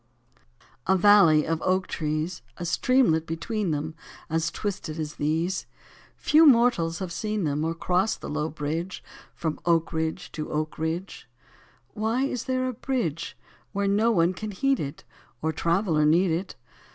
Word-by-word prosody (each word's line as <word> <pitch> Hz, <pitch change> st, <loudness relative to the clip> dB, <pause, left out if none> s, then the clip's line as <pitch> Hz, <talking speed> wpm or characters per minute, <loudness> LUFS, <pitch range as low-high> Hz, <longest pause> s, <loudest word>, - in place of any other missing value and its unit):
67 190 Hz, -, +4 dB
A -, -, +3 dB
VALLEY 185 Hz, -6 st, +6 dB
of 165 Hz, 0 st, -1 dB
oak 185 Hz, +1 st, +1 dB
trees, 155 Hz, +2 st, -3 dB, 0.2 s
A 175 Hz, -, -5 dB
streamlet 165 Hz, -3 st, +2 dB
between 185 Hz, +5 st, -2 dB
them 155 Hz, +1 st, -2 dB, 0.4 s
As 165 Hz, +1 st, +1 dB
twisted 185 Hz, -5 st, -4 dB
as 150 Hz, -1 st, -4 dB
these; 165 Hz, +5 st, -1 dB, 0.5 s
Few 310 Hz, +2 st, +5 dB
mortals 235 Hz, -, +4 dB
have 185 Hz, -3 st, -5 dB
seen 215 Hz, +2 st, -2 dB
them, 150 Hz, -1 st, 0 dB
Or 165 Hz, +1 st, -1 dB
crossed 180 Hz, +5 st, 0 dB
the -, -, -6 dB
low 155 Hz, +1 st, -2 dB
bridge 160 Hz, +5 st, -4 dB, 0.3 s
From 160 Hz, -2 st, -3 dB
oak 165 Hz, -1 st, +2 dB
ridge 160 Hz, +3 st, -2 dB
to 155 Hz, -1 st, -5 dB
oak 155 Hz, 0 st, -3 dB
ridge. 160 Hz, -3 st, -4 dB, 0.6 s
Why 220 Hz, -, -1 dB
is 255 Hz, -4 st, -2 dB
there 255 Hz, -1 st, 0 dB
a 255 Hz, -, -2 dB
bridge 220 Hz, -, -3 dB, 0.4 s
Where 200 Hz, 0 st, 0 dB
no 210 Hz, +4 st, +3 dB
one 175 Hz, -5 st, +3 dB
can 215 Hz, +4 st, -6 dB
heed 270 Hz, +7 st, +1 dB
it. 140 Hz, -1 st, -5 dB, 0.4 s
Or 160 Hz, -, 0 dB
traveller 170 Hz, -1 st, +1 dB
need 170 Hz, +4 st, +4 dB
it. 175 Hz, +4 st, -3 dB
170 Hz, 160 wpm, -26 LUFS, 160-205 Hz, 0.6 s, VALLEY